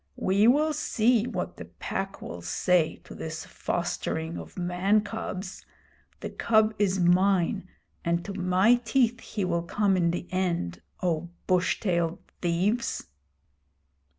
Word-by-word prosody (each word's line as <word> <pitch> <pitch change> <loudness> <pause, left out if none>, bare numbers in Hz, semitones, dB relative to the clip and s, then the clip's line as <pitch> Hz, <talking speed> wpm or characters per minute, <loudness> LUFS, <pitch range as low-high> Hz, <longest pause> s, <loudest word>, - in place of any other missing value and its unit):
We 200 +3 +3
will 300 +5 +4
see 240 -5 +2
what - - -4
the - - -7
Pack 195 0 -5
will 85 - -7
say 165 - +2
to - - -11
this 160 0 -6
fostering 170 -1 -2
of - - -9
man 180 +4 +2
cubs. 200 -3 -5 0.6
The - - -5
cub 220 -1 +3
is 195 -2 +2
mine, 185 +2 +3 0.4
and 170 0 0
to 200 - -5
my 190 +6 +3
teeth 240 0 +2
he 205 -3 -3
will 170 -1 0
come 195 +3 +1
in 175 -2 +2
the 175 +1 -2
end, 175 - -1 0.2
O 170 -1 0 0.2
bush 180 -1 +2
tailed 170 -5 0 0.2
thieves!' 190 +8 0
185 Hz, 135 wpm, -27 LUFS, 175-215 Hz, 0.6 s, will